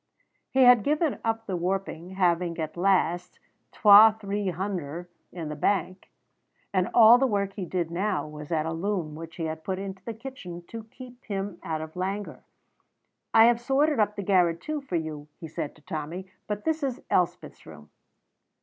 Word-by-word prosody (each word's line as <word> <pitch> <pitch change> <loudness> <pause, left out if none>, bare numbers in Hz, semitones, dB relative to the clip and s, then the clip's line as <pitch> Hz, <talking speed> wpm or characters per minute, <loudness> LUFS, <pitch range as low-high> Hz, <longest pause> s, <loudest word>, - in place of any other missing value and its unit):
He 265 0 +4
had 245 -2 +7
given 300 +2 0
up 225 0 -1
the 190 - -3
warping, 185 0 -3
having 175 -2 +1
at 155 -1 -4
last 180 -1 +1 0.3
"twa 215 +1 +7
three 205 -1 -3
hunder'" 175 -3 -4 0.2
in 170 -3 -6
the 150 - -5
bank, 185 +3 -1 0.6
and 185 -2 +1
all 235 +1 +8
the 270 - +3
work 200 -3 -1
he 195 -3 -5
did 170 -2 -2
now 190 +3 -1
was 150 +1 -10
at 155 -2 0
a 160 - -2
loom 175 -2 -2
which 165 +1 -9
he 165 - -5
had 160 0 -4
put 190 +1 -3
into 190 -1 -7
the 230 +1 -6
kitchen 200 -8 -9
to 225 -1 -8
keep 250 +1 -13
him 195 -3 -4
out 160 -4 -3
of 160 +1 -8
languor. 195 +3 -4 0.9
"I 225 - +7
have 235 0 +3
sorted 275 +2 +2
up 210 0 +2
the 200 - -4
garret, 180 -3 +3
too, 305 -1 -4
for 270 -10 -5
you," 155 -3 -4
he 165 - -7
said 150 -1 -5
to 150 - -22
Tommy, 165 +2 -5 0.2
"but 210 0 -4
this 320 0 0
is 265 -4 -3
Elspeth's 175 -1 -1
room." 75 -2 -13
190 Hz, 185 wpm, -27 LUFS, 165-220 Hz, 0.9 s, all